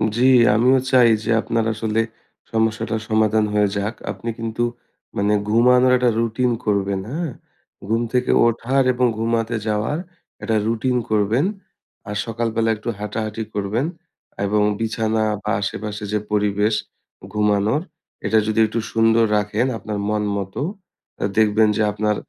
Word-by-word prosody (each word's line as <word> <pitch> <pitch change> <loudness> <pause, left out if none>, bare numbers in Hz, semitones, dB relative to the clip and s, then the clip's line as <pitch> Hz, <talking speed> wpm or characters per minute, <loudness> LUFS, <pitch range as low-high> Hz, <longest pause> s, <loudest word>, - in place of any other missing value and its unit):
জি 125 +2 +3 0.3
আমিও 125 +4 +4
চাই 125 -3 +6
যে 115 - -1
আপনার 115 -1 -1
আসলে 110 0 0 0.5
সমস্যাটার 110 0 0
সমাধান 110 0 +3
হয়ে 105 0 +3
যাক। 105 +3 -2 0.2
আপনি 120 - -6
কিন্তু 115 +1 -2 0.5
মানে 100 +1 +2 0.2
ঘুমানোর 125 +3 +5
একটা 125 -1 +2
রুটিন 115 +2 +1
করবেন, 100 -2 0
হ্যাঁ? 165 -1 -3 0.6
ঘুম 115 +2 +1
থেকে 125 0 +2 0.2
ওঠার 125 +4 +1
এবং 125 0 +1
ঘুমাতে 115 +1 0
যাওয়ার 110 +8 0 0.5
একটা 110 +1 0
রুটিন 125 +3 0
করবেন। 110 - +2 0.6
আর 105 - -4
সকালবেলা 115 0 -1
একটু 105 - -5
হাঁটাহাঁটি 110 +1 -3
করবেন 105 +7 -1 0.6
এবং 105 +1 +1 0.2
বিছানা 110 0 0 0.2
বা - - -1
আশেপাশে 105 +1 -4
যে 105 - +2
পরিবেশ 105 +1 +1 0.6
ঘুমানোর, 105 +5 +1 0.4
এটা 110 - +3
যদি 110 +1 0
একটু 110 +2 -2
সুন্দর 115 0 +4
রাখেন 105 +3 0
আপনার 105 0 -5
মন 105 0 0
মত, 95 -1 -5 0.7
আ - - 0
দেখবেন 110 0 +4
যে - - +1
আপনার 105 +1 0
110 Hz, 135 wpm, -21 LUFS, 105-115 Hz, 0.7 s, চাই